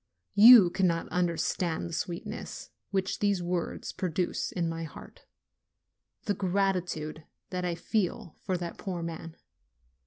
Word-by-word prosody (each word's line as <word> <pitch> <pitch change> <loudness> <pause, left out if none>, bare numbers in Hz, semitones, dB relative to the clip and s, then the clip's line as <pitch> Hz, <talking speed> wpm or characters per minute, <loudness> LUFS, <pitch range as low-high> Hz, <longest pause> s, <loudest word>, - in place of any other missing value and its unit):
you 205 -3 +9
cannot 175 -3 +1
understand 175 -1 0
the 170 - -8
sweetness 170 +1 -5 0.2
which 190 -1 -1
these 200 -3 +1
words 175 -1 -3
produce 180 -1 -2
in 170 -2 -1
my 165 0 -3
heart, 160 - -11 1.0
the 205 - 0
gratitude 180 -5 -1 0.3
that 180 -1 -2
I 175 -1 -1
feel 185 +1 -2
for 185 -2 -2
that 170 -1 -6
poor 180 -4 -4
man. 165 0 -6
180 Hz, 125 wpm, -29 LUFS, 170-190 Hz, 1.0 s, you